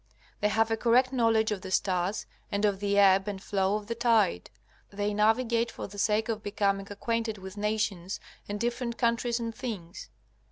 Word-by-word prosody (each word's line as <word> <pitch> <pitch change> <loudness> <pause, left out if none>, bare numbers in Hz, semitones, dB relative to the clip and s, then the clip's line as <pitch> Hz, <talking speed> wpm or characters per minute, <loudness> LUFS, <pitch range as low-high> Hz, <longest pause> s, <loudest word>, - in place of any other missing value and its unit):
They 210 - +2
have 225 +2 +1
a 225 - +1
correct 250 +3 +3
knowledge 225 -3 +3
of 200 -3 -2
the 190 - -7
stars, 185 +1 0 0.3
and 205 0 +1
of 200 -2 +1
the 200 0 0
ebb 195 0 +5
and 200 -2 -3
flow 195 0 0
of 210 -1 -4
the 230 - -3
tide. 225 - +2 0.4
They 205 +1 -2
navigate 230 +2 +2
for - - -7
the 205 +1 -9
sake 215 +1 +2
of 220 -2 -2
becoming 200 -1 0
acquainted 225 +1 -2
with 190 0 -9
nations 205 -3 -2 0.3
and 205 0 -3
different 235 +1 -2
countries 235 0 +1
and 230 -1 -3
things. 195 -9 -6
210 Hz, 185 wpm, -29 LUFS, 200-230 Hz, 0.4 s, ebb